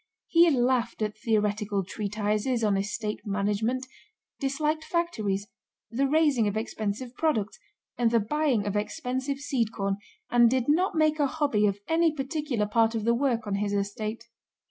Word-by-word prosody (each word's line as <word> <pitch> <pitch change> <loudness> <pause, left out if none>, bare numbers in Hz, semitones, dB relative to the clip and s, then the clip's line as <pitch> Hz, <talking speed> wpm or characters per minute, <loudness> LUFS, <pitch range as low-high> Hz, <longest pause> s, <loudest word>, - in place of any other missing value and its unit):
He 340 0 +5
laughed 245 -4 +1
at 210 0 -2
theoretical 210 -2 0
treatises 210 +4 -1
on 210 -2 +3
estate 210 +2 -2
management, 210 +5 -1 0.5
disliked 300 +3 -1
factories, 215 - -1 0.5
the 270 +4 +1
raising 290 -6 +3
of 205 +1 -1
expensive 220 +2 -3
products, 250 - -1 0.4
and 235 -1 +4
the 230 0 +3
buying 250 -1 +1
of 205 0 -2
expensive 260 +5 -2
seed 255 -5 -1
corn, 195 -2 -2 0.3
and 240 -1 +6
did 255 0 0
not 345 +5 +2
make 310 -1 +2
a 290 - +3
hobby 270 -8 +1
of 200 -1 0
any 325 0 +3
particular 275 -5 -2
part 225 +2 +2
of 220 - -1
the 235 +2 +3
work 235 -3 0
on 205 - -3
his 205 0 -1
estate. 215 +3 -3
230 Hz, 155 wpm, -27 LUFS, 210-275 Hz, 0.5 s, and